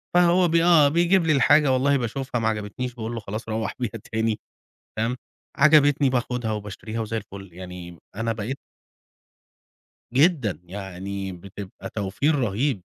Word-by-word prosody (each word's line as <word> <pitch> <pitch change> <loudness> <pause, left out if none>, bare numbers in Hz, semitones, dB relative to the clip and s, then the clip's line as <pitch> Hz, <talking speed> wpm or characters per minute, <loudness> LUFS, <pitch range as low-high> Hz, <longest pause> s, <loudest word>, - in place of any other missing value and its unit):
فهو 175 +1 +5
ب 165 - 0
آه، 165 -3 +6
بيجيب 175 +3 +3
لي 155 - +3
الحاجة، 145 0 +5
والله 140 +2 +3
باشوفها، 125 0 -3
معجبتنيش، 110 +3 -2
باقول 115 0 -5
له 115 - -3
خلاص، 110 +2 -6
روح 110 -2 -2
بيها 120 -4 -2 0.2
تاني. 110 -1 0 0.6
تمام. 115 +3 0 0.4
عجبتني، 145 -2 +5
باخدها 125 -3 -1
وباشتريها، 105 +2 -5
وزي 115 0 -3
الفل. 100 -3 -8
يعني 90 -1 -9 0.2
أنا 115 +1 -1
بقيت. 115 +5 -4 1.6
جدًا، 135 - +3
يعني 95 +1 -6
بتبقى 95 +2 -9
توفير 105 +10 0
رهيب 120 -2 0
115 Hz, 135 wpm, -24 LUFS, 100-140 Hz, 1.6 s, آه